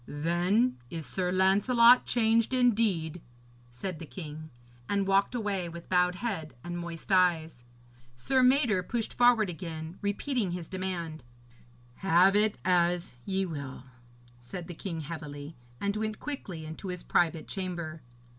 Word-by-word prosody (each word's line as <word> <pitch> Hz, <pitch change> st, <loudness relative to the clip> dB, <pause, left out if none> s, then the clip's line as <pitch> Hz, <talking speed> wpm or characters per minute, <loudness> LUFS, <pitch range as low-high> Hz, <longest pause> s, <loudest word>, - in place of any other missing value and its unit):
'Then 175 Hz, +11 st, +1 dB
is 160 Hz, +2 st, -5 dB
Sir 180 Hz, -1 st, -2 dB
Lancelot 230 Hz, +6 st, +5 dB
changed 230 Hz, +1 st, +2 dB
indeed,' 205 Hz, -10 st, +2 dB, 0.5 s
said 160 Hz, +8 st, -5 dB
the 165 Hz, -, -7 dB
king, 155 Hz, -2 st, -8 dB, 0.4 s
and 200 Hz, -1 st, +1 dB
walked 195 Hz, +4 st, +2 dB
away 200 Hz, -6 st, -1 dB
with 170 Hz, 0 st, -10 dB
bowed 180 Hz, -1 st, +3 dB
head 180 Hz, -, -4 dB
and 175 Hz, 0 st, -5 dB
moist 170 Hz, +2 st, -7 dB
eyes. 165 Hz, -8 st, +2 dB, 0.5 s
Sir 260 Hz, -, +2 dB
Mador 250 Hz, -6 st, +4 dB
pushed 225 Hz, +5 st, -3 dB
forward 240 Hz, -3 st, +5 dB
again, 165 Hz, -1 st, -6 dB
repeating 205 Hz, -1 st, -1 dB
his 175 Hz, -2 st, -5 dB
demand. 175 Hz, -6 st, -4 dB, 0.7 s
'Have 190 Hz, +1 st, +4 dB
it 210 Hz, 0 st, +3 dB
as 175 Hz, -2 st, +2 dB
ye 190 Hz, 0 st, 0 dB
will,' 140 Hz, -7 st, -6 dB, 0.6 s
said 125 Hz, +9 st, -8 dB
the 175 Hz, -, -6 dB
king 165 Hz, -1 st, -5 dB
heavily, 150 Hz, -1 st, -7 dB, 0.2 s
and 200 Hz, 0 st, -1 dB
went 215 Hz, 0 st, -2 dB
quickly 190 Hz, -, -6 dB
into 160 Hz, +5 st, -7 dB
his 180 Hz, -1 st, -5 dB
private 165 Hz, -2 st, +1 dB
chamber. 170 Hz, -5 st, -4 dB
180 Hz, 135 wpm, -29 LUFS, 165-205 Hz, 0.7 s, Lancelot